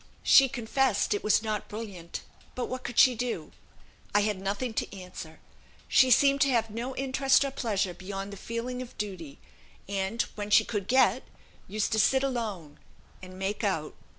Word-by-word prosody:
She 270 -1 +7
confessed 245 -2 +1
it 205 - -2
was 210 +1 +3
not 215 -2 -3
brilliant, 200 -6 -7 0.3
but 250 - -2
what 255 0 -5
could 240 - -6
she 255 - +7
do? 245 +1 -4 0.6
I 205 - +6
had 205 -2 -1
nothing 205 +5 -2
to 210 - -3
answer. 170 -3 -10 0.5
She 260 - +5
seemed 275 +3 +5
to 275 - +5
have 230 -3 +1
no 240 +4 -4
interest 270 +1 +2
or 275 - -3
pleasure 205 -8 -1
beyond 195 +2 -6
the - - -8
feeling 235 +4 -4
of 250 - -10
duty, 180 -9 -6 0.5
and, 195 +3 -1
when 205 -1 -5
she 210 - +5
could 205 -4 -3
get, 255 -2 +4 0.5
used 215 +3 -1
to 220 - +1
sit 265 +5 +3
alone, 215 - -4 0.4
and 185 0 -11
'make 195 +4 -3
out.' 165 -7 -1
215 Hz, 175 wpm, -28 LUFS, 195-255 Hz, 0.6 s, She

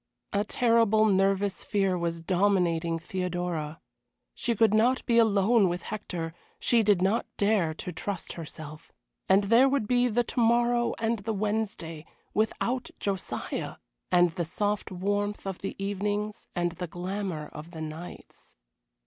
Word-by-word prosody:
A 200 0 +2
terrible 230 -1 +3
nervous 195 -1 +2
fear 195 -3 +1
was 170 -1 -2
dominating 175 -2 +2
Theodora. 175 -3 -3 0.5
She 235 -2 -1
could 220 -1 +4
not 240 +4 +3
be 235 -1 +4
alone 210 -1 +4
with 175 0 -3
Hector, 175 -6 -5 0.3
she 235 -1 +3
did 205 -4 +3
not 200 +5 +1
dare 200 -6 +2
to 180 - -5
trust 195 0 -4
herself. 155 -2 -9 0.4
And 195 +2 +5
there 235 +6 +5
would 270 -6 0
be 245 +1 +3
the 240 +1 +2
to 240 - -4
morrow 240 +1 +3
and 225 0 0
the 220 +3 -3
Wednesday 200 -6 -3 0.3
without 235 +4 0
Josiah 195 -3 -3 0.4
and 175 -1 +5
the 170 +1 -2
soft 205 +6 -2
warmth 205 +3 -1
of 190 -2 -4
the 195 - -5
evenings 205 +1 -2
and 175 -1 0
the 180 +1 -5
glamour 180 -2 -4
of 150 +2 -8
the 165 -2 -8
nights. 155 +3 -9
200 Hz, 145 wpm, -28 LUFS, 175-220 Hz, 0.5 s, And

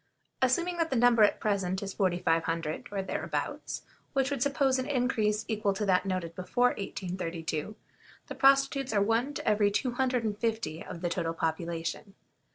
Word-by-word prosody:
Assuming 345 +8 +2
that 330 -1 +1
the 265 - -1
number 240 -1 +5
at 210 - +5
present 195 -2 0
is 195 -1 -5
4500, 165 -4 0
or 195 -1 -2
thereabouts, 190 - -3 0.3
which 270 0 +1
would 275 -3 -2
suppose 275 -1 +2
an 260 - -2
increase 225 -5 +1
equal 210 -3 0
to 210 +2 -2
that 190 0 +2
noted 185 -3 -2
before 185 +8 +2
1832, 175 -3 -4 0.5
the - - -7
prostitutes 275 -1 +3
are 200 -1 +3
one 230 +7 +1
to - - -5
every 210 -1 +4
two 210 +5 0
hundred 250 -1 0
and 210 -2 -2
fifty 225 -8 -2
of 170 -2 -8
the 175 - 0
total 165 -2 -2
population. 165 +4 -3
210 Hz, 165 wpm, -29 LUFS, 180-250 Hz, 0.5 s, number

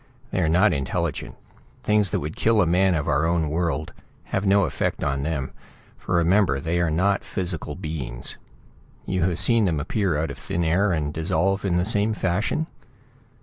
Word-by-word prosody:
They 95 - 0
are 80 - +2
not 95 +4 +4
intelligent. 70 -3 -2 0.5
Things 105 -2 +2
that - - -1
would 75 +2 -5
kill 115 -1 +2
a 95 - +4
man 90 +2 +3
of 75 - -2
our 80 +3 +2
own 80 -3 0
world 80 -1 -1 0.3
have 100 +1 -2
no 100 +1 +5
effect 80 - -2
on 70 -1 0
them, 70 -3 -2 0.4
for - - -3
remember 85 -1 +3
that 70 - -5
they 85 +1 0
are 85 - +1
not 95 +5 +1
physical 85 -6 -4
beings. 75 -9 -5 0.7
You 95 -1 -1
have 85 0 +1
seen 115 +1 +4
them 80 -5 0
appear 85 +1 0
out 80 +2 -1
of - - -9
thin 85 - -2
air, 90 +5 +2
and 75 -3 -1
dissolve 95 +4 0
in 90 -3 +1
the 90 - +1
same 105 +1 +2
fashion?" 100 - 0
85 Hz, 190 wpm, -24 LUFS, 80-95 Hz, 0.7 s, no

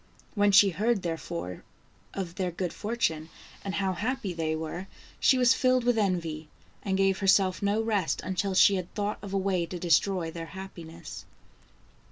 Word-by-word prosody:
When 205 -1 +3
she 200 0 +7
heard, 210 +4 0
therefore, 90 - -5 0.5
of 185 -4 -4
their 185 0 -2
good 175 0 -4
fortune, 170 -8 -2 0.3
and 195 -1 -3
how 195 -1 0
happy 215 0 -2
they 160 -1 -1
were, 160 +4 -5 0.3
she 260 - +4
was 250 0 +5
filled 255 -1 +2
with 245 0 +2
envy, 165 -7 -1 0.3
and 190 -1 -1
gave 195 -1 +2
herself 190 -1 +3
no 205 +2 +1
rest 205 -6 0
until 190 +1 -1
she 195 +1 +6
had 180 -1 -5
thought 205 0 -2
of 200 - -8
a 195 - 0
way 190 -3 0
to 180 - -6
destroy 175 0 +1
their 165 0 -7
happiness. 170 -4 -9
190 Hz, 170 wpm, -28 LUFS, 170-205 Hz, 0.5 s, she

